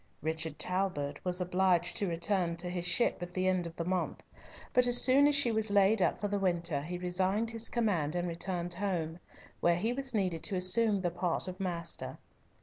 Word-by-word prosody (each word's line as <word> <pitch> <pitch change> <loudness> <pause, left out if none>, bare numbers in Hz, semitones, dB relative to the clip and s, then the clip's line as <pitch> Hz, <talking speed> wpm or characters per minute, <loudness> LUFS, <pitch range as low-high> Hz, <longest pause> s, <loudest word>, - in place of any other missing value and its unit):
Richard 160 -1 -2
Talbot 180 -4 -2
was 180 0 0
obliged 180 -1 +1
to 200 - 0
return 170 0 0
to 175 +1 -3
his 175 -1 -2
ship 190 +2 +2
at 175 0 -7
the 185 0 +1
end 185 -2 +1
of 165 - -10
the 170 - -4
month, 185 0 -2 0.5
but 250 0 +4
as 245 0 +5
soon 275 +2 +5
as 295 - +3
she 280 -4 +3
was 220 -1 +1
laid 200 +1 +4
up - - +1
for 205 - -1
the 205 0 -1
winter 170 -6 0
he 175 +4 -5
resigned 190 +5 0
his 225 0 -4
command, 180 -10 0
and 175 0 -1
returned 175 +1 -3
home, 175 -3 -2 0.4
where 170 0 +3
he 220 +7 -1
was 265 -2 -3
needed 180 -6 0
to 195 - -2
assume 195 +3 +3
the 175 -2 -1
part 175 +1 -1
of 185 +1 -7
master. 170 -3 -3
180 Hz, 205 wpm, -31 LUFS, 170-205 Hz, 0.5 s, as